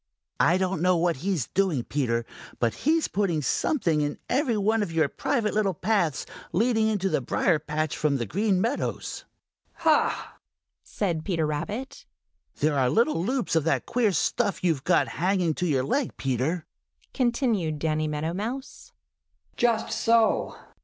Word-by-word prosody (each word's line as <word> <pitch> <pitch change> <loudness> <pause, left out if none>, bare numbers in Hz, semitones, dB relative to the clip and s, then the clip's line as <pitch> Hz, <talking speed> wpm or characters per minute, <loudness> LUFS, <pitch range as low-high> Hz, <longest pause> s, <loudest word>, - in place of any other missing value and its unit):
"I 175 +2 +4
don't 185 -3 -1
know 180 0 +3
what 170 -2 +1
he's 170 - -1
doing, 185 -10 +1
Peter, 120 -5 -1 0.3
but 115 -2 +1
he's 320 +2 +1
putting 180 -7 0
something 165 - +1
in 145 0 -2
every 255 -4 +1
one 215 +2 +2
of 200 -5 -2
your 160 -2 +2
private 220 - -1
little 200 -4 +1
paths 175 - 0 0.3
leading 220 +3 +2
in 220 -1 +1
from 155 -4 0
the 120 - -2
Green 200 - +1
Meadows." 235 +8 -2 0.5
"Ha!" 320 -2 +1 0.4
said 170 -6 -2
Peter 165 -5 0
Rabbit. 215 - -4 0.5
"There 145 -1 +2
are 130 -1 +3
little 230 - +2
loops 245 -4 -1
of 160 - +3
that 165 - +1
queer 235 -4 +1
stuff 200 +5 0
you've 160 -7 +1
got - - +3
hanging 180 -1 0
to 180 +3 -2
your 135 -5 +1
leg, 265 - -1
Peter," 135 +6 -1 0.5
continued 235 - 0
Danny 155 0 0
Meadow 150 +2 -2
Mouse. 240 +8 -6 0.6
"Just 235 -2 +1
so!" 230 -1 +2
180 Hz, 145 wpm, -26 LUFS, 155-225 Hz, 0.6 s, I